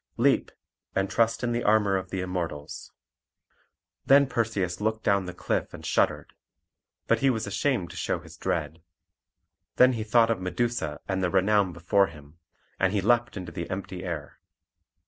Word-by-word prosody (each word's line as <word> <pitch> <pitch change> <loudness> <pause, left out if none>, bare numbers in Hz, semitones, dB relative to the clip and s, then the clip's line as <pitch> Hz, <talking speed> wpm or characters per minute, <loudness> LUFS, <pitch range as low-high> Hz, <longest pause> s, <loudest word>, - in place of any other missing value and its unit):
Leap, - - +3 0.5
and 95 0 0
trust 115 +1 +1
in 120 - 0
the 120 0 -1
armour 105 -2 +3
of 95 -2 -3
the 95 -1 -3
Immortals." 85 -5 -5 1.1
Then 140 +1 +6
Perseus 105 -7 -1
looked 110 +1 -1
down 100 -2 +2
the - - -4
cliff - - -2
and - - -11
shuddered; - - 0 0.7
but - - +2
he 135 - +3
was 115 -3 -1
ashamed 100 -1 -1
to - - -11
show - - -1
his - - -13
dread. 80 +2 -3 0.9
Then 125 0 +6
he 110 -2 -3
thought 115 +1 +4
of 105 -5 -1
Medusa 90 -4 -2
and 95 -1 -1
the 90 - +2
renown 95 +1 +3
before 90 +4 +2
him, 75 0 -15 0.4
and 95 0 +2
he 105 - +2
leapt 120 +3 +2
into 90 -3 -6
the 85 0 -5
empty 95 -1 -5
air. 85 -5 -6
100 Hz, 165 wpm, -27 LUFS, 90-115 Hz, 1.1 s, Then